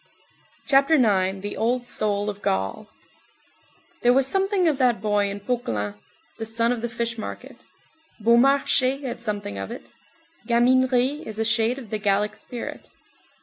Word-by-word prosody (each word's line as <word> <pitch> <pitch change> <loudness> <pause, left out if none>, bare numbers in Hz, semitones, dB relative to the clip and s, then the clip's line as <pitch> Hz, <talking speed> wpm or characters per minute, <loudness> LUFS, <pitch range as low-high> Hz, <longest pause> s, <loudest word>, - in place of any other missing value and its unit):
CHAPTER 275 +3 +4
IX—THE 200 -5 +1
OLD 245 +2 0
SOUL 205 -2 -1
OF 205 0 -14
GAUL 95 - -2 1.1
There 245 - +5
was 270 +1 +3
something 385 +3 +1
of 295 -4 +1
that 245 -4 +3
boy 205 -1 +1
in 200 +1 -5
Poquelin, 115 - -2 0.5
the 225 - -3
son 230 +1 +1
of 245 -2 -2
the 240 - -3
fish 235 0 -3
market; - - -8 0.5
Beaumarchais 260 +3 +3
had 245 -3 -5
something 205 - -4
of 95 - -5
it. - - -9 0.6
Gaminerie 255 +3 +3
is 215 -1 -6
a 225 - 0
shade 225 +2 +2
of 240 -6 -10
the 215 - -2
Gallic 205 +1 +1
spirit. 235 +2 -8
230 Hz, 145 wpm, -24 LUFS, 205-255 Hz, 1.1 s, There